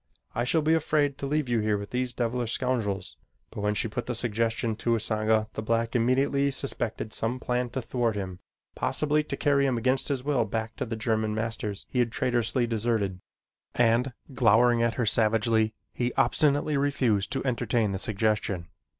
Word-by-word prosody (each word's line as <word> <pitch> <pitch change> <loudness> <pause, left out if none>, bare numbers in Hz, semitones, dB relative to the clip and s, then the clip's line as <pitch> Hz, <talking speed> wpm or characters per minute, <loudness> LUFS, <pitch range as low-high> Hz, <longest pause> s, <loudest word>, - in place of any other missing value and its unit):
I 120 - -1
shall 160 +4 +2
be 160 +2 +3
afraid 150 -3 +1
to 140 - -3
leave 150 -1 0
you 120 -1 +1
here 105 -1 +1
with 100 0 -7
these 125 0 -1
devilish 120 0 -1
scoundrels." 110 -7 -2 0.3
But 110 - -6
when 105 0 0
she 110 - 0
put 120 +3 -5
the 125 - -2
suggestion 115 0 -1
to 115 +1 0
Usanga 110 0 +1
the - - -4
black 115 +1 0
immediately 135 +4 +2
suspected 120 -5 -2
some 120 +3 -1
plan 125 0 -1
to 125 +1 -4
thwart 115 -2 0
him 95 -3 -5 0.3
possibly 150 0 +1
to 140 -2 -5
carry 140 -1 +3
him 130 -3 0
against 130 +3 +1
his 135 -3 -1
will 140 -4 +2
back 110 +1 -3
to - - -3
the 115 - -3
German 110 -1 0
masters 110 -2 -3
he 125 - -2
had 120 -1 +2
traitorously 120 0 +1
deserted, 110 -5 -1 0.5
and 120 +2 +3 0.2
glowering 120 0 +4
at 115 0 +1
her 120 - 0
savagely, 110 0 +2 0.2
he 120 0 -1
obstinately 145 +3 +2
refused 130 -8 +1
to 135 - -2
entertain 120 -4 +1
the 95 - -3
suggestion. 105 -5 0
115 Hz, 180 wpm, -27 LUFS, 110-130 Hz, 0.5 s, glowering